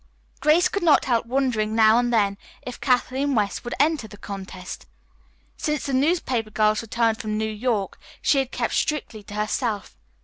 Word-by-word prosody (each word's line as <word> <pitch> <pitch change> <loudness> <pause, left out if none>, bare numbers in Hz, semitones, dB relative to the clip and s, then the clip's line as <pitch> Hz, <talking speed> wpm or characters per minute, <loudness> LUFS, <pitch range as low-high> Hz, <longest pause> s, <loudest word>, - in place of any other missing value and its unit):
Grace 315 +4 +4
could 400 - -3
not 320 -4 +4
help 235 -2 +1
wondering 235 -4 0
now 220 +1 +6
and 245 0 0
then 205 -4 +2 0.3
if 250 - -8
Kathleen 265 +2 +1
West 205 -3 0
would 240 - -4
enter 295 -5 +2
the 205 - -13
contest. 190 -2 -8 0.7
Since 300 -2 -2
the 275 - -2
newspaper 260 -6 +1
girl's 215 0 +2
return 230 0 +1
from 215 -2 -4
New 220 - 0
York 215 -2 -2 0.2
she 275 - +3
had 265 -1 -2
kept - - -2
strictly 285 -8 -1
to 205 0 -10
herself. 210 0 -2
230 Hz, 170 wpm, -24 LUFS, 215-265 Hz, 0.7 s, now